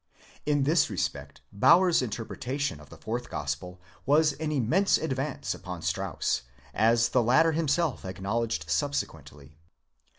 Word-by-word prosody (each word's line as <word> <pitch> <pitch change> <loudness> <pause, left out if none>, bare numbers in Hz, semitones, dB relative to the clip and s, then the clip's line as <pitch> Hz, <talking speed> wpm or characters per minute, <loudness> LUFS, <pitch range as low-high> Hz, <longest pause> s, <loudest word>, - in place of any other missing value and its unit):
[ἢ 145 -2 +2
this 160 +4 +3
respect - - -4
Baur's 170 - +5
interpretation 125 - -3
of 75 -1 -15
the 80 - -12
Fourth 120 +7 -4
Gospel 75 +5 -4 0.2
was 150 +1 +3
an 155 +1 -4
immense 155 - +2
advance 140 -1 -3
beyond 90 -2 -8
Strauss, - - -1 0.3
as 115 +2 +3
the 125 - +3
latter 150 +8 +4
himself 160 -2 0
ac 95 0 -7
knowledged 100 -5 -2
subsequently. 75 -1 -3
120 Hz, 130 wpm, -28 LUFS, 90-150 Hz, 0.3 s, Baur's